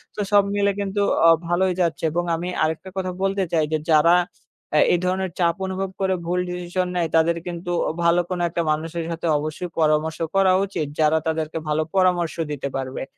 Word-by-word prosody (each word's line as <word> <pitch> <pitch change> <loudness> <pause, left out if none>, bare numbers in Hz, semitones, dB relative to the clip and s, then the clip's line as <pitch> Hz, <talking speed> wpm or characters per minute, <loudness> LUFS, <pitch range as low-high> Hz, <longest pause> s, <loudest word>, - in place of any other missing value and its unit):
তো - - -9
সব 205 -1 +6
মিলে 200 0 +2
কিন্তু 200 0 -1 0.3
অ - - +8 0.2
ভালোই 180 +2 +1
যাচ্ছে 165 -2 -1
এবং 175 +2 0
আমি 175 +2 -4 0.2
আরেকটা 160 +4 -2
কথা 185 -1 -2
বলতে 195 0 +1
চাই, 160 -2 +2
যে 155 - +2
যারা 165 +3 +6 0.6
অ্যা 150 - +5
এই 175 - +2
ধরনের 185 0 -1
চাপ 170 -1 +2
অনুভব 190 0 -3
করে 190 0 +2
ভুল 180 +2 0
ডিসিশন 180 +1 -2
নেয়, 170 -2 +1
তাদের 165 +1 +3
কিন্তু 175 0 -5 0.3
ভালো 170 +1 +4
কোনো 180 -1 -2
একটা 170 +1 -2
মানুষের 165 +2 -3
সাথে 165 +1 -3
অবশ্যই 155 +4 -4
পরামর্শ 155 +1 +1 0.2
করা 190 -1 +4
উচিত 165 -6 -3
যারা 155 0 +4
তাদেরকে 160 0 -2
ভালো 150 +1 +1
পরামর্শ 180 -3 +2 0.2
দিতে 140 -1 -3
পারবে। 130 0 -4
170 Hz, 185 wpm, -22 LUFS, 160-185 Hz, 0.6 s, অ